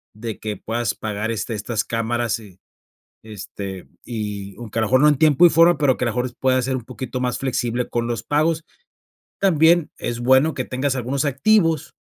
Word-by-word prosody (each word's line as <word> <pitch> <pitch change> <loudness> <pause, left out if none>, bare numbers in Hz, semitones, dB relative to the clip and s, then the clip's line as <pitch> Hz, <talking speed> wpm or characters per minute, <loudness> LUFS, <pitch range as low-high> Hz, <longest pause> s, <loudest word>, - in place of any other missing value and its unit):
de 110 0 -6
que 105 -1 -4
puedas 115 +2 -2
pagar, 110 +1 -3
este, 115 +1 -3
estas 110 +1 -2
cámaras. 115 0 -1
Y, 100 -4 -15 0.6
este 100 -3 -8 0.2
y 105 -4 -5
aunque, 115 -2 -8
a - - +2
lo 110 - 0
mejor 130 +3 +4
no 150 - +6
en 145 - +2
tiempo 155 +2 +5
y 175 - +8
forma 165 +1 +5
pero, 135 -3 +3
que 125 - -1
a - - +1
lo 115 - 0
mejor, 125 +1 -2
pueda 130 -1 +2
ser 130 +1 -1
un 125 - -7
poquito 130 +1 -6
más 125 -1 -1
flexible 125 -2 -2
con 120 -1 -1
los 120 -1 -2
pagos, 155 +2 0 0.8
también, 170 -3 +4
es 120 0 -4
bueno 130 +5 +4
que 130 - -3
tengas 130 +1 -1
algunos 130 +3 -2
activos 165 +1 +2
125 Hz, 200 wpm, -21 LUFS, 110-145 Hz, 0.8 s, y